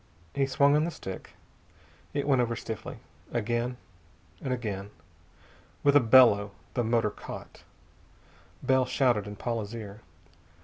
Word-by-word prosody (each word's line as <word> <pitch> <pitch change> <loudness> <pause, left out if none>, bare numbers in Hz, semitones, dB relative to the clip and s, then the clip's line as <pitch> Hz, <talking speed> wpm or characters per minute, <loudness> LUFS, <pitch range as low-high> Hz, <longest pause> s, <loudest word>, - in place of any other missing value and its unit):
He 135 -1 +1
swung 140 +1 +4
on 150 - +3
the 170 - 0
stick. 95 - -8 0.8
It 145 0 -2
went 135 -3 +4
over 120 -1 0
stiffly. 110 -2 -6 0.3
Again, 120 +2 -1 0.6
and 130 - -3
again. 105 -5 -3 0.9
With 145 0 +5
a - - +9
bellow, 110 -5 +6 0.2
the 120 - 0
motor 115 -2 +2
caught. - - -9 1.0
Bell 130 -1 +3
shouted 125 -6 +2
in 105 - -6
Paula's 115 0 -3
ear. 105 -1 -8
120 Hz, 130 wpm, -29 LUFS, 105-130 Hz, 1.0 s, a